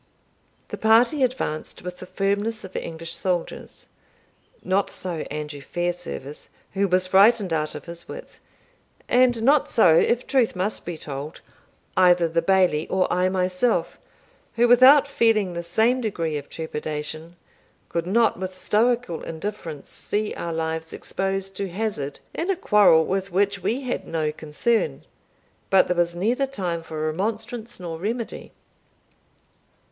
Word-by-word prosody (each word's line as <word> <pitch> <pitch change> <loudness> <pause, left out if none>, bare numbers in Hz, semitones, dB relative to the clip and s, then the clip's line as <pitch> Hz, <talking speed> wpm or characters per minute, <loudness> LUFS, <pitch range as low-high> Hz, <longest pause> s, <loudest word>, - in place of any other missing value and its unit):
The - - -5
party 235 +6 +4
advanced 245 -15 -2
with 180 0 -7
the 185 - -9
firmness 200 +4 -1
of 190 - -10
English 165 +1 -5
soldiers. 180 -3 -4 0.8
Not 190 +1 +1
so 180 -3 -4
Andrew 150 -1 -6
Fairservice, 175 -3 -5 0.2
who 200 0 +1
was 185 0 +2
frightened 195 0 +4
out 155 -1 -1
of - - -8
his 170 0 -9
wits; - - -10 0.7
and 245 -2 +3
not 280 +3 +4
so, 180 -8 +5
if 240 +7 +2
truth 255 -7 +1
must 190 +2 -2
be 175 -2 -4
told, 145 +1 -7 0.5
either 180 -2 +5
the 165 +1 0
Bailie 180 -4 +2
or 190 -1 +1
I 180 +1 +2
myself, 185 +5 0 0.6
who, 235 +1 +4
without 260 +4 +7
feeling 225 -8 +2
the 170 - -3
same 225 +9 +1
degree 165 -8 -2
of 145 -1 -6
trepidation, 155 +1 -5 0.5
could 170 0 -3
not 225 0 +2
with 185 0 -5
stoical 230 -2 +1
indifference 165 -3 -6
see 210 0 -3
our 170 - -4
lives 160 0 -3
exposed 195 0 -3
to 195 -1 -3
hazard 175 -8 -3
in 340 - -3
a 390 - +2
quarrel 200 - +5
with 195 0 -2
which 200 +2 +1
we 250 +5 -1
had 255 -2 -4
no 155 -2 -1
concern. 155 +10 -1 0.7
But 190 -1 +5
there 180 - -1
was 170 0 +1
neither 240 +9 0
time 180 -10 -3
for 155 -1 -5
remonstrance 220 +8 -4
nor 165 -3 -6
remedy. 230 +5 -4
185 Hz, 140 wpm, -24 LUFS, 165-225 Hz, 0.8 s, without